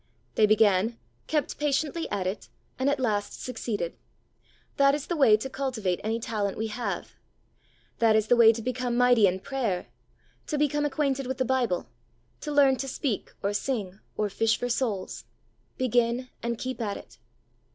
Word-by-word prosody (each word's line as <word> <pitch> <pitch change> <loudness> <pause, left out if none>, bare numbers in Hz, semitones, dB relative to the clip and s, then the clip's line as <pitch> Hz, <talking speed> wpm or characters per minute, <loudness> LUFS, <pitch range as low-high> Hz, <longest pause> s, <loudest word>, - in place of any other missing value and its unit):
They 215 - +4
began, 215 +1 +3 0.3
kept 300 -2 -1
patiently 295 +3 0
at 190 -2 -2
it, 190 +3 -4 0.3
and 265 +2 +2
at 285 - 0
last 210 -5 -1
succeeded. 225 -8 -3 0.8
That 275 0 +5
is 290 - -4
the 345 - -2
way 250 -8 +6
to 220 - -4
cultivate 250 -9 -2
any 225 +2 -1
talent 210 -3 -2
we 220 0 -2
have. 235 +3 -4 0.9
That 225 -2 +5
is 215 -1 +3
the 245 - +4
way 230 -1 +8
to 230 0 -5
become 250 0 -1
mighty 245 -4 +6
in 185 +1 -1
prayer, 220 - -2 0.6
to 300 - -1
become 295 0 +1
acquainted 275 -3 0
with 260 0 -3
the 260 - +1
Bible, 245 -8 0 0.5
to 300 - -5
learn 275 -2 +5
to 270 - -4
speak 260 -4 -2
or 200 +1 0
sing 205 -4 -2 0.2
or 210 - +1
fish 225 +2 +2
for 245 - -3
souls. 230 -6 -2 0.5
Begin 245 0 +1
and 235 0 -2
keep 255 0 -4
at 205 -3 -2
it. - - -14
240 Hz, 170 wpm, -27 LUFS, 215-265 Hz, 0.9 s, way